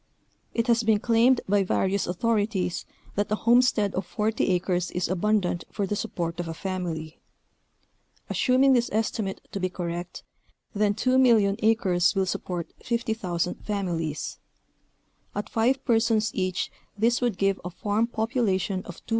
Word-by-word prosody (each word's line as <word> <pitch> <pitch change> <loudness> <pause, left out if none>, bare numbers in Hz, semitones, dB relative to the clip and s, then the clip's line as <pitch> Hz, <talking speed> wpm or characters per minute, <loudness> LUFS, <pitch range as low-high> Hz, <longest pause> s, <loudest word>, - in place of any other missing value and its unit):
It 230 - +1
has 235 -1 +3
been 220 -2 +3
claimed 235 +3 +4
by 200 +1 +3
various 195 +1 0
authorities 205 -1 0 0.3
that 205 +1 -1
a - - +3
homestead 235 -3 +3
of 190 - -1
forty 215 +4 -1
acres 180 -1 0
is 180 - -1
abundant 185 -1 0
for 200 - -1
the 205 - -2
support 175 -6 -3
of 175 - -3
a 165 - -5
family, 170 -4 -4 1.1
assuming 265 +1 +3
this 240 -1 +2
estimate 215 -2 -1
to 200 - -4
be 185 -1 0
correct, 175 -1 -5 0.5
then 205 0 +1
2,000,000 230 -5 +4
acres 195 -5 +3
will 190 -1 +2
support 180 -2 -4
50,000 220 -7 -2
families; 170 -7 -3 1.0
at 205 - -3
five 250 +4 +1
persons 225 -3 +2
each 185 -1 -1 0.3
this 235 +4 +2
would 240 -6 0
give 195 0 +1
a 180 - -4
farm 210 +5 0
population 220 -5 0
of 175 - -11
250,000. - - -17
205 Hz, 145 wpm, -26 LUFS, 180-225 Hz, 1.1 s, claimed